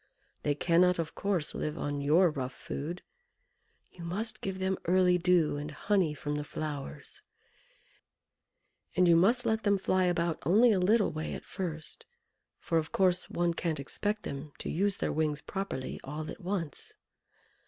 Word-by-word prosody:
they 145 - +1
cannot, 180 +4 +4
of 165 -1 -3
course, 190 -6 -1
live 150 - -3
on 145 0 -2
your 160 +5 +4
rough 130 -3 -4
food. 170 +6 -5 0.9
You 175 - -11
must 205 +7 -3
give 190 -1 -3
them 190 0 -1
early 180 0 +4
dew, 170 -4 +3
and 145 +1 -4
honey 180 0 +1
from 145 0 -3
the 150 - -2
flowers, 150 - -6 1.7
and 180 -1 +5
you 170 - +7
must 230 +9 +4
let 220 -1 +1
them 200 -2 +3
fly 185 -1 +2
about 170 -2 0
only 220 +8 +5
a 195 - +3
little 205 +4 +3
way 155 +1 -4
at - - -9
first; 160 -4 -6 0.5
for, 165 - 0
of 160 - -5
course, 180 -2 +2
one 175 0 +1
can't 165 -2 -2
expect 205 +9 -2
them 140 +1 -6
to - - -4
use 195 +3 +1
their - - -1
wings 150 -1 0
properly 190 -8 -4
all 150 +3 -5
at - - -10
once. 175 -6 -4
175 Hz, 165 wpm, -30 LUFS, 150-190 Hz, 1.7 s, you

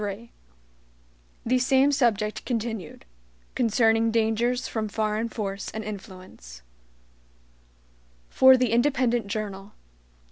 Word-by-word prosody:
3 205 +3 -6 1.1
The 250 +2 +2
Same 265 +2 +3
Subject 215 -6 0
Continued 225 -8 -5 0.5
(Concerning 225 -1 +2
Dangers 230 +2 0
From 220 -1 -3
Foreign 215 +2 -2
Force 200 -3 -5
and 220 - -6
Influence) 185 - -10 1.6
For 260 0 +6
the 250 -3 0
Independent 240 -2 +1
Journal. 200 -1 -5
225 Hz, 95 wpm, -25 LUFS, 205-240 Hz, 1.6 s, For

